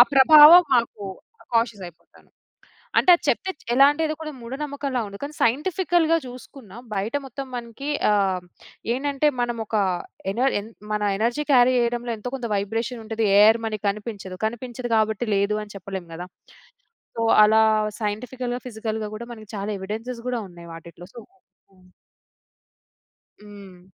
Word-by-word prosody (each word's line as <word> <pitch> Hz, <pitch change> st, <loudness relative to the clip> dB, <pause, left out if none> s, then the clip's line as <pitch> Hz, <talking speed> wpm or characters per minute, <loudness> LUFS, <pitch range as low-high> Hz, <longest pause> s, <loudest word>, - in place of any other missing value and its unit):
ప్రభావం 305 Hz, +5 st, +9 dB
మాకు 230 Hz, -3 st, 0 dB, 0.5 s
కాషియసయిపోతాను. 200 Hz, -8 st, -4 dB, 0.7 s
అంటే -, -, +1 dB
అది -, -, -13 dB
చెప్తే 380 Hz, -, 0 dB
చ్ -, -, -21 dB
ఎలా 275 Hz, +3 st, +7 dB
అంటే 295 Hz, +2 st, -4 dB
ఎదో 310 Hz, -, -1 dB
కూడా 305 Hz, -1 st, -5 dB
మూఢ 235 Hz, +2 st, -8 dB
నమ్మకంలా 280 Hz, -3 st, -3 dB
ఉంది. 200 Hz, 0 st, -10 dB
కానీ 290 Hz, +1 st, -6 dB
సైంటిఫికల్‌గా 330 Hz, -, +2 dB
జూసుకున్నా 250 Hz, -3 st, -12 dB, 0.2 s
బయట 205 Hz, +5 st, -2 dB
మొత్తం 270 Hz, +1 st, -7 dB
మనకి 240 Hz, +4 st, -6 dB, 0.2 s
ఆహ్, 195 Hz, -3 st, +1 dB, 0.5 s
ఏంటంటే 280 Hz, +3 st, 0 dB
మనమోక 230 Hz, -2 st, -3 dB, 0.6 s
ఎన 225 Hz, -, -5 dB, 0.2 s
ఎన్ 210 Hz, -, -9 dB, 0.2 s
మన 210 Hz, 0 st, -1 dB, 0.2 s
ఎనర్జీ 240 Hz, +7 st, -1 dB
క్యారీ 255 Hz, -1 st, +5 dB
జేయడంలో 240 Hz, 0 st, -1 dB
ఎంతో‌కొంత 250 Hz, +2 st, -5 dB
వైబ్రేషనుంటది. 225 Hz, +2 st, -3 dB
ఎయిర్ 220 Hz, +2 st, +6 dB
మనకి 215 Hz, -1 st, -5 dB
కనిపించదు. 200 Hz, -3 st, -6 dB
కనిపించదు 240 Hz, +1 st, -5 dB
గాబట్టి 220 Hz, +1 st, 0 dB
లేదు 200 Hz, +2 st, +1 dB
అని 210 Hz, -, -12 dB
చెప్పలేం 190 Hz, -2 st, -7 dB
గదా! 175 Hz, +2 st, -7 dB, 0.9 s
సో 230 Hz, -, -1 dB, 0.2 s
అలా 220 Hz, +1 st, +5 dB, 0.4 s
సైంటిఫికల్‌గా, 245 Hz, +4 st, -4 dB
ఫిజికల్‌గా 220 Hz, -1 st, -4 dB
గూడా 235 Hz, +2 st, -8 dB
మనకి 215 Hz, -2 st, -14 dB
చాలా 200 Hz, +2 st, -4 dB
ఎవిడెన్సెస్ 225 Hz, +5 st, -6 dB
గూడా 245 Hz, -2 st, -1 dB
ఉన్నాయి 170 Hz, -1 st, -13 dB
వాటిట్లో 170 Hz, +1 st, -12 dB
సో 235 Hz, -, -9 dB, 0.5 s
హ్మ్. 185 Hz, -1 st, -23 dB, 1.5 s
హ్మ్. 195 Hz, -3 st, -14 dB
230 Hz, 135 wpm, -23 LUFS, 205-255 Hz, 1.5 s, ప్రభావం